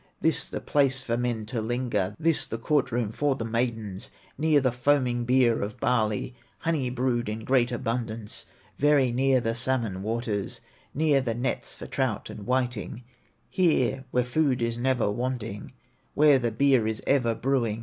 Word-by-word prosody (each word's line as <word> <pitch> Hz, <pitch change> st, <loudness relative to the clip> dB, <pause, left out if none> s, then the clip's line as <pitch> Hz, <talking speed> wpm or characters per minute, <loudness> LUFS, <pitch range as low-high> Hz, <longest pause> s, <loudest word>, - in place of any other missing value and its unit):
This -, -, +2 dB
the -, -, -4 dB
place 135 Hz, -2 st, +1 dB
for 115 Hz, -2 st, -1 dB
men 120 Hz, -2 st, -2 dB
to 110 Hz, +1 st, -3 dB
linger, 110 Hz, -4 st, -1 dB
This 165 Hz, -1 st, +2 dB
the 115 Hz, -, -4 dB
court 135 Hz, +2 st, +1 dB
room 115 Hz, -3 st, -1 dB
for 145 Hz, +3 st, 0 dB
the 115 Hz, -, -4 dB
maidens, 110 Hz, -4 st, -2 dB, 0.3 s
Near 155 Hz, 0 st, +3 dB
the 130 Hz, -2 st, +1 dB
foaming 125 Hz, -1 st, +1 dB
beer 125 Hz, -2 st, +3 dB
of 105 Hz, +4 st, -5 dB
barley, 110 Hz, 0 st, 0 dB, 0.2 s
Honey 155 Hz, -6 st, -1 dB
brewed 125 Hz, -2 st, -1 dB
in 110 Hz, +1 st, -4 dB
great 125 Hz, -2 st, +2 dB
abundance, 115 Hz, -2 st, -3 dB, 0.3 s
Very 145 Hz, -3 st, +4 dB
near, 130 Hz, +1 st, +3 dB
the 115 Hz, -1 st, -1 dB
salmon 120 Hz, -6 st, -1 dB
waters, 110 Hz, -2 st, -2 dB, 0.4 s
Near, 145 Hz, -2 st, +3 dB
the 115 Hz, -3 st, -2 dB
nets 120 Hz, +2 st, -3 dB
for -, -, -9 dB
trout -, -, -2 dB
and 105 Hz, -, -9 dB
whiting, 125 Hz, -2 st, -1 dB, 0.4 s
Here 135 Hz, -8 st, +1 dB
where 125 Hz, -1 st, +1 dB
food 130 Hz, +1 st, +1 dB
is 115 Hz, -1 st, -1 dB
never 120 Hz, -3 st, +1 dB
wanting, 115 Hz, -3 st, -4 dB, 0.4 s
Where 145 Hz, -2 st, +6 dB
the 120 Hz, -2 st, -1 dB
beer 130 Hz, -1 st, +3 dB
is 110 Hz, -1 st, -3 dB
ever 125 Hz, -5 st, +2 dB
brewing. 120 Hz, -4 st, 0 dB
125 Hz, 165 wpm, -27 LUFS, 115-130 Hz, 0.4 s, Where